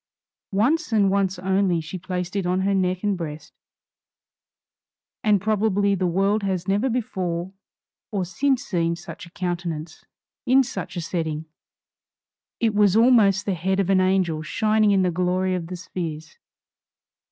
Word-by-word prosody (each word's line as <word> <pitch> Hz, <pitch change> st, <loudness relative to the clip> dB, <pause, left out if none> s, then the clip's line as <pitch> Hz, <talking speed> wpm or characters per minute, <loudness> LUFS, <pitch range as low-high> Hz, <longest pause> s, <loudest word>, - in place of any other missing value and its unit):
Once 275 Hz, -, +1 dB
and 205 Hz, -3 st, +3 dB
once 195 Hz, -1 st, +1 dB
only 190 Hz, -1 st, +1 dB
she 165 Hz, +3 st, -6 dB
placed 180 Hz, 0 st, -4 dB
it 195 Hz, -3 st, -1 dB
on 180 Hz, +1 st, +1 dB
her 195 Hz, +1 st, +1 dB
neck 185 Hz, -1 st, 0 dB
and 205 Hz, -1 st, +1 dB
breast, 150 Hz, -3 st, -7 dB, 1.7 s
and 210 Hz, -2 st, +4 dB
probably 205 Hz, 0 st, +1 dB
the 185 Hz, -2 st, 0 dB
world 195 Hz, +5 st, +1 dB
has 185 Hz, -3 st, -2 dB
never 205 Hz, +7 st, +1 dB
before 185 Hz, -7 st, -3 dB, 0.6 s
or 195 Hz, -4 st, -2 dB
since 265 Hz, +8 st, 0 dB
seen 170 Hz, -7 st, 0 dB
such 175 Hz, 0 st, -10 dB
a -, -, -14 dB
countenance 170 Hz, -3 st, -4 dB, 0.4 s
in 265 Hz, +1 st, +4 dB
such 200 Hz, -7 st, -6 dB
a 175 Hz, -, -2 dB
setting. 160 Hz, -2 st, -3 dB, 1.1 s
It 225 Hz, -2 st, +1 dB
was 205 Hz, -2 st, +4 dB
almost 220 Hz, -4 st, +5 dB
the 200 Hz, -, 0 dB
head 190 Hz, +3 st, -1 dB
of 195 Hz, -1 st, +1 dB
an 190 Hz, -1 st, +4 dB
angel 185 Hz, -4 st, +1 dB
shining 215 Hz, +6 st, +2 dB
in 195 Hz, -2 st, +3 dB
the 180 Hz, -, +1 dB
glory 185 Hz, +2 st, 0 dB
of 175 Hz, -2 st, -3 dB
the 180 Hz, -, -6 dB
spheres. 160 Hz, -3 st, -6 dB
190 Hz, 150 wpm, -23 LUFS, 175-205 Hz, 1.7 s, almost